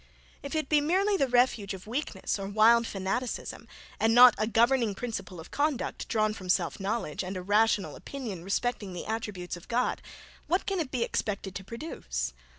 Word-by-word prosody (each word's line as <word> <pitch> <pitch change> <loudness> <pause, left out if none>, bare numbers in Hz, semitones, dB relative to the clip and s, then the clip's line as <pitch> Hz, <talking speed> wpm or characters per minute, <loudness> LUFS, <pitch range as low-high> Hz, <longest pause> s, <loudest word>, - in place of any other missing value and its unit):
If 280 - -5
it 310 -3 0
be 300 0 +4
merely 380 +7 +2
the 275 -8 +2
refuge 245 -5 +2
of 190 - -12
weakness 220 -5 -3
or 195 - -4
wild 225 +3 +5
fanaticism, 195 +6 -3 0.3
and 225 +1 +3
not 245 -1 +10
a 215 - +1
governing 230 -1 +3
principle 220 -6 -5
of 160 - -11
conduct, 290 -3 -1
drawn 215 -2 +1
from 185 -4 -9
self 180 -1 +1
knowledge, 195 -4 -2
and 185 +1 -4
a 180 - -5
rational 210 +1 +2
opinion 225 -11 -6
respecting 200 0 -2
the 175 - -6
attributes 210 -6 -4
of 175 - -15
God, 245 +1 0 0.5
what 360 +3 +1
can 390 -2 -1
it 310 -6 -2
be 255 -3 0
expected 200 -4 -2
to 195 - -6
produce? 190 - -4
225 Hz, 180 wpm, -29 LUFS, 195-250 Hz, 0.5 s, not